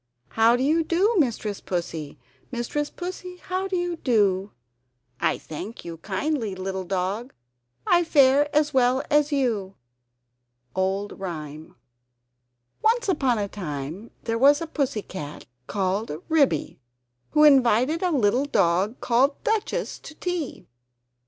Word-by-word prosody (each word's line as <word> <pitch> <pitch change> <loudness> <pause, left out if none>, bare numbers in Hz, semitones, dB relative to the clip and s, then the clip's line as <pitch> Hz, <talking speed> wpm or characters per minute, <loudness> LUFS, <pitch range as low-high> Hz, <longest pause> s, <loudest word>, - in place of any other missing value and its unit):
How 225 +1 +4
do 250 - 0
you 320 +4 +3
do 365 +8 +2
Mistress 220 -7 -1
Pussy? 165 -4 -4 0.3
Mistress 260 +4 -2
Pussy, 360 0 -7
how 370 +2 -3
do 380 - -2
you 350 -1 -1
do?" 205 -7 +1 0.7
"I - - +1
thank 180 +9 -8
you 165 -1 -6
kindly, 215 - -2
little 190 0 -4
dog, 195 +7 -2 0.5
I 350 0 +4
fare 285 -2 +4
as 300 0 +2
well 260 +1 +3
as 295 0 +3
you!" 225 -9 0 1.0
[Old 195 +2 -1
Rhyme] 155 -4 -7 1.1
Once 470 +2 +2
upon 270 -9 +2
a 205 -1 -1
time 170 +1 -6
there 230 0 -1
was 285 +3 +6
a 330 - -3
Pussy 275 -9 -2
cat 150 -6 -8 0.2
called 195 +2 -1 0.2
Ribby, 280 - +2 0.5
who 300 - +5
invited 270 +1 +5
a 365 - +2
little 250 -3 +2
dog 190 -2 +1
called 260 +4 +2
Duchess 445 +3 -1
to 310 - -11
tea. 355 -5 -4
245 Hz, 130 wpm, -25 LUFS, 195-300 Hz, 1.1 s, was